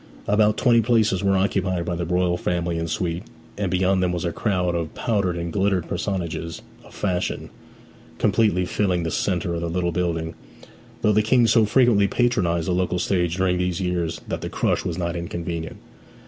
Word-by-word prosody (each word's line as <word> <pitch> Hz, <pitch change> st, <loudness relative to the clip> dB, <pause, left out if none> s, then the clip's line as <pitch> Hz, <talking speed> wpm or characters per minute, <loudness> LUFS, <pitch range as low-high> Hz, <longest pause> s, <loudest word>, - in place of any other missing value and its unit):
About 105 Hz, +1 st, +3 dB
twenty 120 Hz, -2 st, +4 dB
places 110 Hz, -5 st, +2 dB
were 100 Hz, -1 st, +3 dB
occupied 95 Hz, -2 st, 0 dB
by 90 Hz, -, -2 dB
the 85 Hz, -1 st, -3 dB
royal 90 Hz, 0 st, +1 dB
family 85 Hz, -1 st, -1 dB
and 85 Hz, 0 st, -3 dB
suite; 85 Hz, +1 st, -2 dB, 0.3 s
and 100 Hz, -2 st, -2 dB
beyond 95 Hz, +1 st, +2 dB
them 90 Hz, -1 st, +1 dB
was 90 Hz, 0 st, -2 dB
a 85 Hz, -, 0 dB
crowd 90 Hz, -3 st, 0 dB
of 85 Hz, -2 st, -3 dB
powdered 100 Hz, -7 st, 0 dB
and 85 Hz, -1 st, -4 dB
glittering 95 Hz, -3 st, +1 dB
personages 85 Hz, -2 st, -3 dB, 0.2 s
of -, -, -16 dB
fashion, 90 Hz, -3 st, -2 dB, 0.7 s
completely 95 Hz, -5 st, +2 dB
filling 90 Hz, -2 st, 0 dB
the 80 Hz, -, -2 dB
centre 90 Hz, 0 st, -1 dB
of 85 Hz, -, -3 dB
the 85 Hz, -, -2 dB
little 85 Hz, 0 st, 0 dB
building; 80 Hz, -2 st, -2 dB, 0.7 s
though 105 Hz, -, +4 dB
the 110 Hz, -, +4 dB
King 120 Hz, +3 st, +4 dB
so 115 Hz, 0 st, +4 dB
frequently 110 Hz, -3 st, +4 dB
patronized 90 Hz, -9 st, +1 dB
the -, -, +1 dB
local 90 Hz, 0 st, 0 dB
stage 90 Hz, -2 st, 0 dB
during 90 Hz, -1 st, +1 dB
these 90 Hz, 0 st, -1 dB
years 90 Hz, -3 st, -1 dB
that -, -, -3 dB
the -, -, -4 dB
crush -, -, 0 dB
was 85 Hz, -1 st, -3 dB
not 85 Hz, -1 st, -2 dB
inconvenient. 85 Hz, -1 st, -4 dB
90 Hz, 185 wpm, -23 LUFS, 85-100 Hz, 0.7 s, twenty